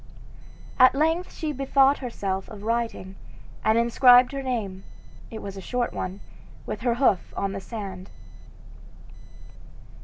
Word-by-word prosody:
At 255 +1 +7
length 325 +5 0
she 310 -2 -4
bethought 275 0 +3
herself 195 -7 -4
of 210 -2 -10
writing, 225 -4 -3 0.5
and 220 +1 +3
inscribed 245 +1 +6
her 275 -1 -4
name 215 -8 -4 0.5
it 220 - -8
was 195 -1 -7
a - - -7
short 245 +4 -2
one 185 +2 -5 0.4
with - - -5
her 240 -2 +1
hoof 235 -8 +1
on 195 - -1
the 195 0 -5
sand. 195 -3 -7
235 Hz, 130 wpm, -25 LUFS, 195-260 Hz, 0.5 s, At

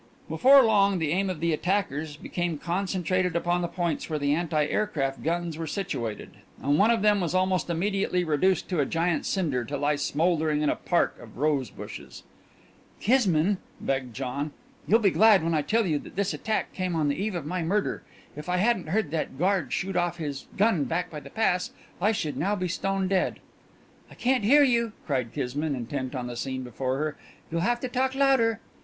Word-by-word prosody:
Before 265 - +6
long 200 -4 +4
the 160 -3 -1
aim 190 +3 +1
of 175 -4 -4
the 170 -1 +2
attackers 155 -4 -1
became 175 0 -3
concentrated 185 +1 -1
upon 175 +1 +1
the 175 - -1
points 170 -3 -2
where 155 - -1
the 145 -1 +1
anti 155 -2 +1
aircraft 145 -7 -1
guns 170 0 -2
were 165 - -3
situated, 120 - -4 0.3
and 145 +2 +1
one 210 +3 +5
of 230 -3 +2
them 210 -2 +4
was 175 0 -1
almost 185 -2 +1
immediately 180 +1 0
reduced 175 +4 +1
to 180 -4 0
a 145 - +3
giant 165 0 0
cinder 150 -11 0
to 145 +5 -4
lie 145 +1 +1
smouldering 155 0 +1
in 150 - +2
a - - -1
park - - 0
of - - -13
rose 140 -4 +1
bushes. - - -10 0.8
"Kismine," 200 -6 +3 0.2
begged 130 -4 -2
John, 140 +3 -3 0.3
"you'll 225 - +6
be 205 -5 +3
glad 215 -4 +5
when 165 0 0
I 155 - +2
tell 220 +9 +1
you 155 -5 +1
that - - -12
this 200 +1 0
attack 220 -1 -2
came 185 -2 -2
on 155 -2 +1
the 140 - +1
eve 210 -2 -2
of 165 -5 -4
my 180 +3 -2
murder. 195 +5 0 0.3
If 150 +4 -7
I 180 - +1
hadn't 190 -4 +1
heard 185 -4 0
that 155 -4 -3
guard 180 -5 +1
shoot 195 0 -2
off 175 -1 0
his 145 -4 -5
gun 195 -8 +3
back 175 +2 -2
by 150 - -6
the - - -12
pass 180 -5 +1 0.3
I 210 +4 +4
should 155 -10 -2
now 195 +8 +1
be 185 -2 -2
stone 195 +2 -1
dead 190 -1 0 0.4
" - - -30
"I - - -14
can't 255 -2 +1
hear 290 +6 +7
you!" 235 -4 +2
cried 130 -6 -1
Kismine, 140 +3 -2
intent 130 +2 -4
on 125 -1 -3
the 120 0 -5
scene 130 +2 -3
before 130 +2 -2
her. 155 +1 -2 0.3
"You'll 165 +1 0
have 240 +6 +1
to 255 - -2
talk 260 +1 0
louder!" 265 -5 +3
175 Hz, 205 wpm, -27 LUFS, 150-195 Hz, 0.8 s, hear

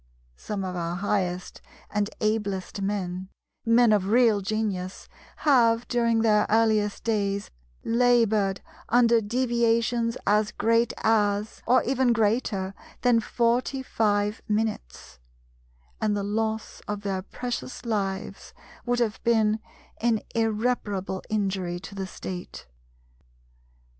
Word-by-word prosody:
Some 200 - -5
of 180 -1 -4
our 170 0 -2
highest 185 -2 -2 0.3
and 205 0 0
ablest 205 -3 -1
men, 190 -2 -3 0.4
men 230 -1 +5
of 195 -2 +1
real 225 -2 +4
genius, 195 -2 -3 0.3
have 240 -5 +3
during 230 -2 +2
their 210 -2 +3
earliest 215 -2 +2
days 200 -3 -1 0.3
laboured 230 -5 +2 0.3
under 235 -1 +5
deviations 235 0 +1
as 210 +1 +2
great 230 +1 +2
as, 210 -1 +1
or 250 +1 +5
even 260 -1 +2
greater 210 -3 0 0.3
than 245 -2 +4
forty 240 +4 0
five 210 -3 0
minutes: 210 - -3 0.8
and 210 -1 +1
the 200 - -2
loss 220 +2 -2
of 210 -1 -3
their 195 -2 -2
precious 245 +5 -6
lives 195 -4 -3 0.3
would 245 0 +2
have 225 -3 -1
been 220 -2 +3 0.4
an 225 -2 +1
irreparable 215 -4 -1
injury 190 -4 -1
to 200 - -9
the 195 -1 -4
State. 180 -1 -7
215 Hz, 115 wpm, -26 LUFS, 200-230 Hz, 0.8 s, men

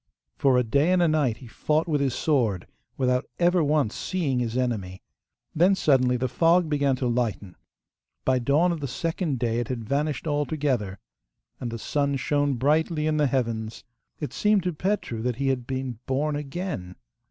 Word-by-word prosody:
For 135 -2 +3
a 125 - +3
day 140 +9 +2
and 185 - +3
a 175 - +4
night 145 -8 +1
he 130 - -13
fought 155 +7 -1
with 150 -3 +1
his 135 -3 0
sword, 115 - +1 0.3
without 125 0 +1
ever 175 -1 +3
once 145 -6 +1
seeing 150 -9 -1
his 120 0 -2
enemy, 105 -8 -2 0.5
then 180 +5 +4
suddenly 130 -7 +3
the 130 +1 -1
fog 165 +6 +3
began 140 -3 +1
to 125 0 -2
lighten. 115 -6 -2 0.7
By 130 -1 +3
dawn 145 +8 +2
of 170 - -3
the 140 - -3
second 165 +2 -2
day 115 -1 0
it 120 - -2
had 115 -3 -4
vanished 145 +2 -1
altogether, 145 -9 -1 0.6
and 120 - -4
the 115 - -5
sun 140 +4 -1
shone 145 +1 0
brightly 150 +4 +1
in 155 -1 +1
the 150 -1 +3
heavens. 115 -4 -2 0.4
It 150 - -5
seemed 210 -3 +2
to 180 -1 -1
Petru 165 - -2
that 125 0 -1
he 135 +2 0
had 125 -2 -1
been 130 -3 -4
born 145 +3 0
again. 145 - -5
140 Hz, 180 wpm, -25 LUFS, 120-155 Hz, 0.7 s, a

